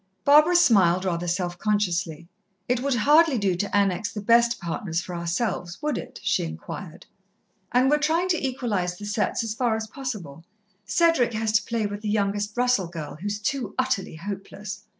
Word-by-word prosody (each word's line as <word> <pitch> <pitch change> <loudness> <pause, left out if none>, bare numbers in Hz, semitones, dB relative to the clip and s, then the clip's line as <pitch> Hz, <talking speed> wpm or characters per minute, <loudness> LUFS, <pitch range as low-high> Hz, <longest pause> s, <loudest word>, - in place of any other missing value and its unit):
Barbara 305 +5 +6
smiled 190 - +4
rather 175 -1 -1
self 175 0 -2
consciously. 175 -6 -1 0.4
"It 245 0 +1
would 275 -1 0
hardly 295 +4 +4
do 200 -4 +1
to 205 +3 -1
annex 200 +1 +1
the 210 - -5
best 235 +3 +3
partners 170 0 -3
for 180 +1 -7
ourselves, 175 +1 -2
would 300 -3 0
it?" - - -7
she - - +1
inquired. 80 0 -8 0.7
"And 250 +2 +4
we're 295 +2 +3
trying 325 +4 +1
to 335 -4 0
equalize 215 -9 -2
the 205 - -8
setts 210 +2 -1
as 225 -1 -3
far 235 -1 0
as 220 0 -3
possible. 210 - -7 0.4
Cedric 250 - +2
has 220 0 0
to 215 - +3
play 230 -2 -1
with 205 0 -4
the 215 - -3
youngest 205 +1 -1
Russell 245 -7 +2
girl, 160 -3 -7
who's 205 +1 -2
too 215 0 -3
utterly 255 -10 -1
hopeless." 195 +3 -7
210 Hz, 175 wpm, -25 LUFS, 180-245 Hz, 0.7 s, Barbara